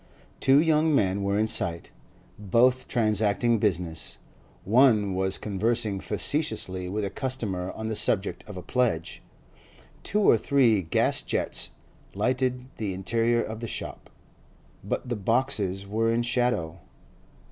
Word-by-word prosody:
Two 135 +1 +5
young 155 -1 +3
men 100 -4 +1
were 100 +1 0
in 110 - +2
sight, 85 -6 -2 0.5
both 125 +6 +2
transacting 110 0 +1
business; 85 -6 -2 0.5
one 110 -3 +4
was 95 +1 0
conversing 110 0 -1
facetiously 95 - -1
with 105 +2 -2
a 100 - -4
customer 105 -9 -3
on 110 - -5
the 110 - -2
subject 100 -1 0
of 105 -3 -8
a 90 - -7
pledge. 115 -11 -1 0.8
Two 210 - 0
or 115 - +5
three 120 -6 +3
gas 80 - +1
jets - - 0 0.4
lighted 125 +3 0
the 100 -4 -3
interior 115 +5 +1
of 110 0 -6
the 115 - -5
shop, - - -7 0.7
but - - -3
the 120 - -2
boxes 105 -3 0
were 110 +3 0
in 120 +1 +1
shadow. 120 -9 -1
110 Hz, 135 wpm, -26 LUFS, 95-125 Hz, 0.8 s, Two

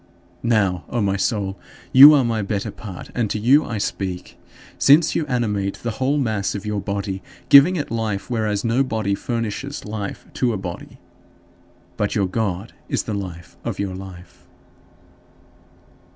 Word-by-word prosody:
Now, 100 -7 +1
O 120 - -2
my 100 -2 +1
soul, 100 -1 -1 0.3
you 145 +4 +11
are 140 - +4
my 115 -2 0
better 100 0 -3
part, 95 -5 -9
and 115 -4 -1
to - - -1
you 130 +8 +4
I 115 - -4
speak; 95 -3 -4 0.4
since 150 +4 +5
you 155 - -1
animate 105 -6 -1
the 120 - -4
whole 140 +3 +2
mass 110 -8 -1
of 100 +1 -6
your 105 -1 -2
body, 100 -1 -3 0.3
giving 140 +7 +8
it 150 -8 -3
life, 110 -4 -2
whereas 110 -4 -1
no 120 +4 +2
body 110 -6 -1
furnishes 120 +6 -4
life 105 -2 -5
to 125 -2 0
a - - -2
body. 90 -2 -8 1.0
But - - -1
your 100 - +2
God 100 +1 -3 0.2
is - - 0
the 110 - -4
life 90 -5 -7
of - - -4
your 100 -2 -3
life. 95 -1 -11
105 Hz, 160 wpm, -21 LUFS, 100-120 Hz, 1.0 s, you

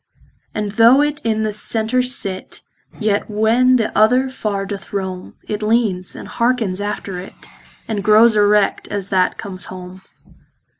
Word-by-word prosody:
And 210 -1 -2
though 230 +6 +5
it 295 0 -2
in 220 -1 0
the 215 -1 -2
center 225 +3 0
sit, 235 -7 -2 0.4
Yet 210 -2 0
when 225 +4 +3
the 230 -3 -1
other 250 +5 +3
far 205 -6 -3
doth 200 -1 -7
rome, 190 -2 -5
It 210 0 -3
leanes, 210 -5 0
andhearkens 230 -6 -1
after 200 -3 -4
it, 185 - -10 0.5
And 210 -3 -3
growes 215 +2 +5
erect, 210 -1 +2
as 200 -1 -4
that 185 -2 +1
comes 185 -2 -7
home. 185 0 -10
210 Hz, 145 wpm, -18 LUFS, 195-230 Hz, 0.5 s, though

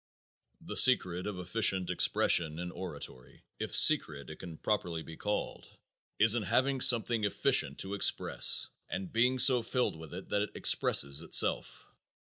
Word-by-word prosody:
"_ - - -21
The - - -6
secret 90 +1 +2
of 105 -3 -6
efficient 95 0 0
expression 80 -2 +2
in 90 +1 -7
oratory 70 -9 -9 0.2
if - - -4
secret 75 0 +2
it 80 - -11
can 85 -4 -11
properly 85 -6 -4
be 80 - -12
called 105 +4 -6 0.5
is 110 0 +4
in 120 - -2
having 130 +7 -1
something 115 -2 +3
efficient 100 - 0
to 95 +1 -7
express 100 - +2 0.2
and 95 -2 -7
being 125 +3 +1
so 125 -1 +4
filled 125 -4 -3
with 80 +1 -12
it 95 - -11
that 100 - -1
it 105 - -6
expresses 70 +2 +1
itself. 85 - -1
95 Hz, 155 wpm, -29 LUFS, 80-115 Hz, 0.5 s, is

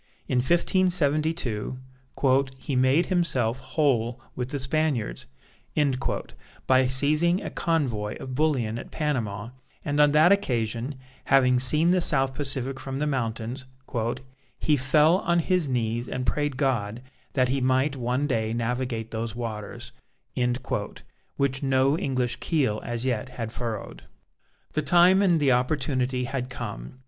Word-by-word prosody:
In 125 - +1
1572 155 - +1 0.8
"he 135 +1 -4
made 130 +7 +3
himself 135 -10 0
whole 130 -3 0 0.2
with 125 0 -3
the 145 - -3
Spaniards" 130 - -1 1.4
by 130 0 +4
seizing 150 +7 +2
a - - -5
convoy 125 -11 -1
of 130 - -7
bullion 125 -6 0
at - - -9
Panama, 115 -9 -2 0.4
and 145 0 -1
on 150 0 +6
that 155 +4 +6
occasion, 125 - 0 0.3
having 125 -2 +4
seen 155 +7 +4
the 185 0 +3
South 135 -5 +5
Pacific 135 -1 -2
from 135 0 -5
the 150 - -1
mountains, 125 -1 -3 0.9
"he 150 - +2
fell 150 +5 +4
on 170 -2 0
his 170 -2 +1
knees 120 -1 -1
and 125 - -3
prayed 145 -3 -1
God 120 -4 -1 0.3
that 130 -2 +2
he 135 +1 0
might 130 +3 +2
one 125 +2 -1
day 115 -5 -1
navigate 115 -1 -2
those 115 0 -4
waters," 110 -4 -6 1.5
which 135 -1 0
no 135 +1 +2
English 130 -5 -1
keel 130 -10 0
as 120 +1 -3
yet 125 -1 -1
had 115 -3 -5
furrowed. 115 -3 -5 0.7
The 155 - 0
time 175 +6 +5
and 175 -5 +3
the 140 -3 +3
opportunity 130 -1 0
had 125 0 -3
come. 120 - -7
130 Hz, 135 wpm, -26 LUFS, 120-150 Hz, 1.5 s, on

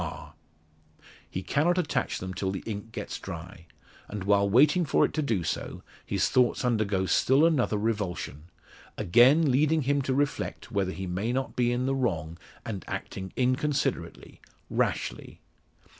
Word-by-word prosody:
R_. - - -7 1.0
He 95 - -4
cannot 165 - +1
attach 175 -5 0
them 95 0 -5
till 95 0 -2
the 95 0 -4
ink 110 0 -6
gets 105 -2 -5
dry; 85 -1 -9 0.4
and, 105 -2 -5
while 100 0 +3
waiting 145 - +5
for 145 - +3
it - - -4
to 155 - 0
do 115 - 0
so, 80 - -4 0.2
his - - 0
thoughts 125 0 +2
undergo 105 -5 +1
still 135 - +4
another 135 -10 +2
revulsion; 100 -8 -3 0.5
again 130 - +5
leading 155 +4 +3
him 140 +2 +1
to 130 -1 -1
reflect 145 0 -2
whether 95 -2 0
he 95 0 -5
may 95 +6 -2
not 130 +1 -2
be 120 -1 +2
in 125 +1 0
the 135 - +1
wrong, 85 - -2 0.3
and 100 -4 -5
acting 95 -1 -5
inconsiderately 130 +3 -1 0.3
rashly. - - -2
115 Hz, 155 wpm, -28 LUFS, 95-135 Hz, 1.0 s, waiting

